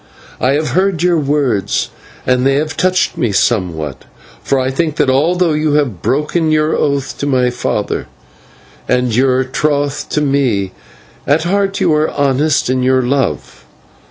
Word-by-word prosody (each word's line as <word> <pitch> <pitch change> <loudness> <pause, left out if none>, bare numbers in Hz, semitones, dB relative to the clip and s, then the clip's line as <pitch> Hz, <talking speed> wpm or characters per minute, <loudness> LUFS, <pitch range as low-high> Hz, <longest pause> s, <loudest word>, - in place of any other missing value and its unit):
I 130 +2 +2
have 150 -1 0
heard 185 +3 0
your 175 -2 +3
words, 140 -8 0 0.3
and 125 0 +2
they 135 +1 +3
have 155 +1 -1
touched 185 +3 0
me 115 - +1
somewhat, 85 - -1 0.4
for 135 - 0
I 130 0 -1
think 155 +2 -1
that 130 - +2
although 165 +5 +2
you 150 0 0
have 135 - 0
broken 150 +4 0
your 155 0 +2
oath 140 -2 -1
to 145 - -2
my 125 -3 +2
father, 120 - -2 0.8
and 125 -2 +1
your 130 +1 +2
troth 145 +1 -1
with 150 - +1
me, 125 -9 0 0.6
at 150 +3 +2
heart 195 +2 0
you - - +2
are 150 +1 +1
honest 140 +1 +1
in 130 0 0
your 130 0 +2
love. 130 0 -2
140 Hz, 155 wpm, -15 LUFS, 125-155 Hz, 0.8 s, your